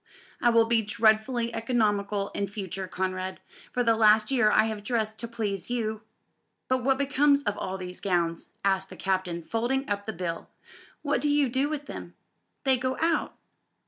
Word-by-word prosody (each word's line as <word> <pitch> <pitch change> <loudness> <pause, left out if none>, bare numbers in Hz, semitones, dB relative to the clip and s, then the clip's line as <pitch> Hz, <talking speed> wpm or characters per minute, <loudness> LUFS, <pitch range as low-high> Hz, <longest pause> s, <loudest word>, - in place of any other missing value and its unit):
"I 240 - +5
will 230 -1 +5
be 230 0 +3
dreadfully 220 +3 +2
economical 210 -4 0
in 200 - -2
future, 190 -2 -5
Conrad. 185 0 -3 0.3
For 245 - 0
the 230 -1 +4
last 215 +1 +5
year 245 -5 +4
I - - +5
have 220 -2 -3
dressed 220 -1 -1
to 235 - -3
please 210 -5 -3
you." 220 -3 -2 0.7
"But 260 -1 +1
what 265 +1 +3
becomes 280 +1 +3
of - - -1
all 190 +1 -4
these 180 -1 -7
gowns?" 170 -3 0 0.2
asked 190 -1 +1
the - - -10
Captain, 185 -3 -1
folding 245 - -1
up 205 0 -3
the - - -1
bill; 170 -1 -4 0.5
"what 290 -1 +1
do 295 - +1
you 290 -2 +3
do 265 +4 +1
with 295 -2 -4
them?" - - -8 0.5
"They 265 -1 +4
go 255 +1 -2
out." 330 +1 +1
220 Hz, 175 wpm, -27 LUFS, 195-255 Hz, 0.7 s, I